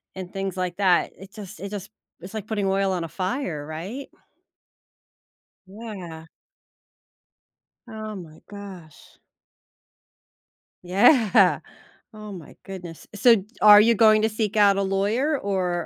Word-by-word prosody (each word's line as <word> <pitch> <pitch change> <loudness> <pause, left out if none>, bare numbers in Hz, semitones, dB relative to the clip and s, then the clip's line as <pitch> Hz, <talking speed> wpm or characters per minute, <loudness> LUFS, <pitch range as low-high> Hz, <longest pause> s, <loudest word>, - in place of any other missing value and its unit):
and 185 -1 -8
things 195 -1 -4
like 180 -1 -3
that, 185 -3 +2
it 195 +2 -14
just 205 -1 -10
it 200 - -6
just 200 0 -7 0.3
it's 185 +3 -10
like 215 -2 -6
putting 210 -3 -2
oil 195 0 +1
on 175 -2 -2
a - - -9
fire, 185 - -3
right? 190 - -7 1.6
Yeah. 190 -6 -9 1.6
Oh 215 -1 -7
my 165 -5 -11
gosh. 195 -6 -12 1.6
Yeah, 195 - +4 0.5
oh 215 -1 -10
my 175 -6 -11
goodness, 180 -4 -9
so 230 +3 +5
g 195 - -5 0.2
are 210 0 +9
you 230 +2 +4
going 215 0 +5
to 220 - +2
seek 215 -1 -3
out 200 -2 +4
a - - +1
lawyer, 205 +10 0
or 180 -6 -2
195 Hz, 130 wpm, -24 LUFS, 180-215 Hz, 1.6 s, are